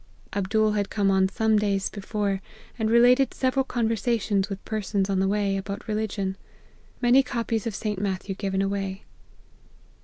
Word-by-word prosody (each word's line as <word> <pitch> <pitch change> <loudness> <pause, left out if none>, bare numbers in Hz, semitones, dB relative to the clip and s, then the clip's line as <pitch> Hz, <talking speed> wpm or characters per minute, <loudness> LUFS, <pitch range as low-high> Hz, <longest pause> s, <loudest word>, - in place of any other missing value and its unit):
Abdool 215 +2 +1
had 205 -1 -1
come 200 -2 +1
on 190 0 +3
some 220 +1 +2
days 200 -2 0
before, 200 -1 -2 0.4
and 220 0 +1
related 245 +3 +5
several 265 +1 +1
conversations 225 -4 0
with 195 -1 -6
persons 205 -2 -1
on 190 - +1
the 190 - +2
way, 200 -1 +1
about 200 +1 -6
re 215 - -1
ligion. 200 -3 -2 0.7
Many 245 +3 +6
copies 230 -4 -2
of 220 - -3
St. 210 -3 -3
Matthew 195 0 -2
given 195 0 -1
away. 195 -1 -3
205 Hz, 155 wpm, -25 LUFS, 195-220 Hz, 0.7 s, Many